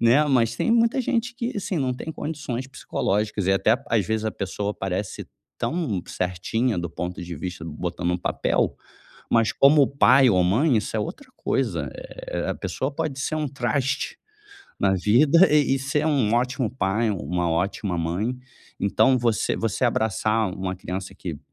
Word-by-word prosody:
né, 120 +6 +5
mas 125 -6 +2
tem - - 0
muita 230 +2 +3
gente 245 0 -1
que, 240 0 -3
assim, 200 -1 -2
não 130 -2 0
tem 145 - -6
condições 145 -6 -4
psicológicas 105 -6 -2
e 95 - +4
até, 110 +4 +3
às 105 -6 +2
vezes, 110 0 -1
a 110 - 0
pessoa 100 +1 -3
parece 95 +1 -4 0.3
tão 145 - -1
certinha 90 +5 -1
do 85 - -3
ponto 90 +2 -5
de 85 0 -6
vista, 90 +1 -6
botando 85 +2 -3
em - - +1
um - - -2
papel, - - 0 0.6
mas 115 -1 +3
como 140 0 +6
pai 135 -1 +5
ou 90 -4 +3
mãe 120 - +3
isso 110 +1 -2
é - - +1
outra 185 - -5
coisa, - - -1
eh, - - -5
a - - -1
pessoa 135 +2 -3
pode 150 -3 -3
ser 155 - -1
um 155 -1 -1
traste 135 +1 -1 0.6
na 95 -1 +3
vida, 140 - +5
e 145 -3 +4
e - - -2
ser 135 +3 -1
um 130 -8 +2
ótimo 125 0 +1
pai, 115 -2 0
uma 90 -1 -1
ótima 90 +2 -1
mãe, 90 +9 -1 0.4
então, 130 +6 +3
você 115 -2 +1
você 115 +3 -1
abraçar 110 -2 +1
uma 95 -1 -3
criança 95 +1 -5
que, 85 -5 -6
115 Hz, 175 wpm, -24 LUFS, 95-140 Hz, 0.6 s, como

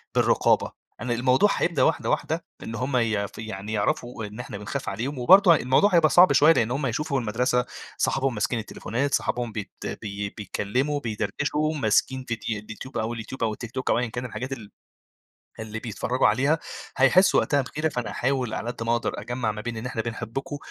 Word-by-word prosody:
بالرقابة، - - +3 0.3
أنا 120 0 -1
الموضوع 130 - +3
هيبدأ 170 -3 +1
واحدة - - +1
واحدة - - -1 0.2
إن 115 - -5
هم 130 +3 -1
يـف 105 -4 0
يعني 110 -1 -6
يعرفوا 115 +2 -1
إن 105 +3 -9
إحنا 125 -4 -6
بنخاف 105 0 -4
عليهم، 125 +8 -4
وبرضو 185 +7 +7
الموضوع 155 +8 +3
هيبقى 160 -2 +5
صعب 175 -4 +7
شويّة 150 +5 +7
لإن 115 -3 +1
هم 135 +2 -1
هيشوفوا 140 +3 -1
المدرسة 125 +3 +1 0.3
صحابهم 135 -2 +1
ماسكين 115 +3 0
التليفونات، 125 +5 -3
صحابهم 120 -2 -1
بيت 105 -2 -6 0.3
بي 100 -1 -4
بيتكلّموا 125 +8 -2
بيدردشوا 140 +7 -1
ماسكين 130 +1 +1
ڤيد - - -3
اليوتيوب 110 +5 -6
أو 110 +2 -1
اليوتيوب 115 +2 -6
أو 110 - +1
التيك 115 +1 -8
توك، 130 -1 -3
أو - - +3
ايًا 125 - 0
كان 120 +3 -5
الحاجات 130 +2 -5
ال 110 -6 -9 0.9
اللي 110 0 -5
بيتفرجوا 120 +2 0
عليها، 140 +9 +2 0.4
هيحسوا 180 +9 +5
وقتها 145 -1 +1
بغيرة، 150 +4 -2
فأنا 125 -4 -3
أحاول 130 -2 -1
على 120 - -3
قد 115 - -6
ما 115 +1 +1
أقدر 120 - -2
أجمع 120 0 -2
ما 105 - -6
بين 115 0 -5
إن 110 - -6
إحنا 115 - -2
بنحبكم، 120 +6 -5
120 Hz, 185 wpm, -25 LUFS, 110-135 Hz, 0.9 s, وبرضو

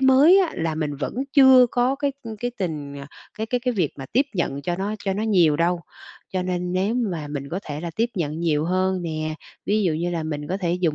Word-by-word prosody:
mới 275 +8 +7
á, 360 -4 +1
là 160 -1 -1
mình 150 -2 -2
vẫn 140 - -4 0.2
chưa 265 -3 +8
có 250 +2 +2
cái, 285 -1 -1
ưm, 225 -2 -7
cái 245 +3 -3
tình 150 -6 -4
à, 140 - -8 0.3
cái 220 - -2
cái 245 +1 -1
cái 250 0 0
việc 175 -7 +1
mà 135 - -6
tiếp 265 +5 +3
nhận 140 -6 -1
cho 175 +4 -1
nó 205 +3 -2
cho 195 - +1
nó 205 +3 -2
nhiều 175 -9 +4
đâu. 170 +1 +1 0.5
Cho 185 - 0
nên 180 -1 -2
nếu 195 +5 +1
mà 185 -11 -2
mình 140 -1 -5
có 185 +4 -3
thể 150 0 -5
là 170 - -4
tiếp 230 +2 +2
nhận 155 -4 -2
nhiều 155 -3 +1
hơn 185 +1 0
nè, 155 -2 -3 0.3
ví 210 +1 +2
dụ 175 - +2
như 170 +3 -1
là 165 -2 -2
mình 150 -2 -4
có 190 - -1
thể 175 -3 -1
dùng 160 -4 +2
180 Hz, 250 wpm, -23 LUFS, 155-220 Hz, 0.5 s, chưa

